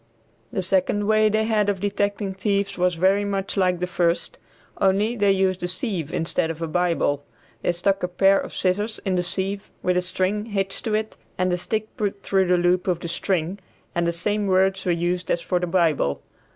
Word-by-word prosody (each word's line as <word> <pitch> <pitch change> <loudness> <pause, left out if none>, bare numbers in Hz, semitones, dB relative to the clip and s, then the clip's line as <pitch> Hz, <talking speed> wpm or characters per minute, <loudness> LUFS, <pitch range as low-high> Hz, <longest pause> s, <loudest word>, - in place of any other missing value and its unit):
The 190 - -1
second 190 +3 +1
way 215 0 +4
they 215 +1 +1
had 215 -2 +1
of 200 -2 -1
detecting 200 0 -1
thieves 200 0 -1
was 180 -1 +1
very 190 +4 +3
much 195 -1 -2
like 185 -3 +2
the 180 - 0
first, 180 - -1 0.4
only 200 +5 +2
they 205 -3 +2
used 190 -1 +1
a 175 - -1
sieve 180 - -3
instead 165 0 0
of 165 -1 -5
a 165 - -2
Bible; 165 -4 0 0.4
they - - +2
stuck 195 +3 0
a 180 - 0
pair 195 +2 +4
of - - -6
scissors 205 +4 -1
in 190 -2 +1
the 180 - +2
sieve 195 +3 -3
with 180 - +2
a - - +3
string 185 +3 -1
hitched 195 -3 -2
to 215 -2 +1
it 215 0 -3 0.2
and 185 0 +1
a - - +1
stick 215 +4 -3
put 205 -3 -2
through 190 -1 +2
the 180 0 +4
loop 175 +1 +2
of 180 -2 +1
the - - -4
string 180 +2 -1 0.3
and 170 0 0
the - - +2
same 205 +4 0
words 190 0 +2
were 180 - +2
used 175 +1 -1
as - - +2
for 180 0 0
the 180 - -2
Bible. 165 - +1
190 Hz, 210 wpm, -23 LUFS, 180-200 Hz, 0.4 s, way